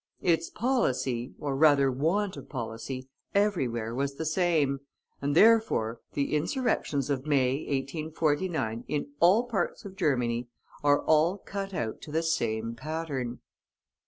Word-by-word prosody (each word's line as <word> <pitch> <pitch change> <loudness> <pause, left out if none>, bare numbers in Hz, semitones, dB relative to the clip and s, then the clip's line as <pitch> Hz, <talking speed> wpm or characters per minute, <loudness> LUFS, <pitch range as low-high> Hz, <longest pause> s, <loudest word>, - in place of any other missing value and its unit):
Its 165 -2 +2
policy, 130 - 0
or 140 -2 -2
rather 140 -2 +5
want 180 +10 0
of - - -10
policy, 130 +1 -5 0.3
everywhere 130 - +1
was 140 +2 -2
the 160 - -4
same, 160 -4 +2 0.4
and, 140 +1 0
therefore, 210 - +4
the 140 0 -1
insurrections 150 - 0
of 135 +1 -2
May, 135 -3 +3
1849, 145 -3 -1
in 145 -1 -2
all 190 +7 +5
parts 215 -8 -2
of 195 -1 -8
Germany, 125 - 0 0.4
are 145 0 +4
all 160 +5 +3
cut 195 -1 -5
out 110 -5 -3
to 150 - -9
the 160 +2 0
same 115 -8 -1
pattern. 135 -2 -4
145 Hz, 130 wpm, -28 LUFS, 130-170 Hz, 0.4 s, rather